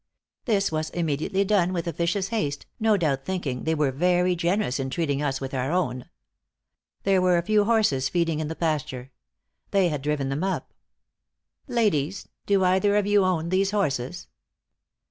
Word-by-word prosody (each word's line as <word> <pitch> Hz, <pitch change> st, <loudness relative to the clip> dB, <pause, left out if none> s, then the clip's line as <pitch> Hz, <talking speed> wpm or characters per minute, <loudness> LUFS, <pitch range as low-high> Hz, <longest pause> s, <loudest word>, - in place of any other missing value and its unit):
This 200 Hz, -6 st, +1 dB
was 155 Hz, 0 st, -2 dB
immediately 170 Hz, +4 st, -1 dB
done 185 Hz, -3 st, +2 dB
with 170 Hz, -2 st, -2 dB
officious 170 Hz, +4 st, -1 dB
haste, 150 Hz, -11 st, -2 dB
no 220 Hz, -2 st, +3 dB
doubt 140 Hz, -6 st, 0 dB
thinking 145 Hz, -8 st, -3 dB
they 160 Hz, 0 st, +1 dB
were 150 Hz, -3 st, +1 dB
very 180 Hz, +5 st, +2 dB
generous 175 Hz, -5 st, 0 dB
in 135 Hz, 0 st, -2 dB
treating 145 Hz, -1 st, -1 dB
us 135 Hz, -2 st, -1 dB
with 135 Hz, 0 st, -6 dB
our 130 Hz, +2 st, -1 dB
own. 130 Hz, -9 st, -1 dB, 0.9 s
There 195 Hz, -1 st, +3 dB
were 180 Hz, -1 st, +3 dB
a 170 Hz, -, 0 dB
few 210 Hz, +2 st, +3 dB
horses 205 Hz, -, +2 dB
feeding 165 Hz, -3 st, 0 dB
in 155 Hz, -, -2 dB
the 160 Hz, -, -5 dB
pasture. 140 Hz, -6 st, -2 dB, 0.6 s
They 195 Hz, -3 st, +3 dB
had 150 Hz, -3 st, -2 dB
them -, -, -12 dB
driven 145 Hz, 0 st, -1 dB
up. 190 Hz, 0 st, -3 dB, 0.9 s
'Ladies, 200 Hz, -, 0 dB, 0.2 s
do 200 Hz, -2 st, +3 dB
either 190 Hz, +3 st, +3 dB
of 210 Hz, -1 st, +2 dB
you 205 Hz, -1 st, +4 dB
own 170 Hz, -3 st, 0 dB
these 190 Hz, +2 st, +2 dB
horses?' 165 Hz, -6 st, -2 dB
170 Hz, 165 wpm, -25 LUFS, 145-195 Hz, 0.9 s, you